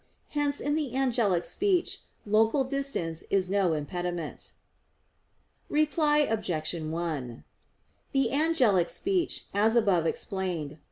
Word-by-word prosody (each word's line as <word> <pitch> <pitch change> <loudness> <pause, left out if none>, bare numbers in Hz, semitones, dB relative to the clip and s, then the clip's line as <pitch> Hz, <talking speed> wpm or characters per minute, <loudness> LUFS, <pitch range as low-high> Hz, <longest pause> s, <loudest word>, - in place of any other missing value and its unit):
Hence 290 -1 0
in 290 - -1
the 295 -5 -2
angelic 230 -10 +1
speech 375 -3 0 0.2
local 220 +6 +3
distance 265 - -3
is 190 -2 +1
no 195 -4 +2
impediment. 175 +1 -4 1.2
Reply 300 0 +3
Obj. 180 -9 -1
1: 155 -7 -4 0.7
The 270 -4 +1
angelic 255 - +3
speech, 375 -3 0
as 215 +3 +3
above 195 -8 +3
explained 180 -5 -2
(A. 155 - -15
205 Hz, 110 wpm, -28 LUFS, 170-280 Hz, 1.2 s, local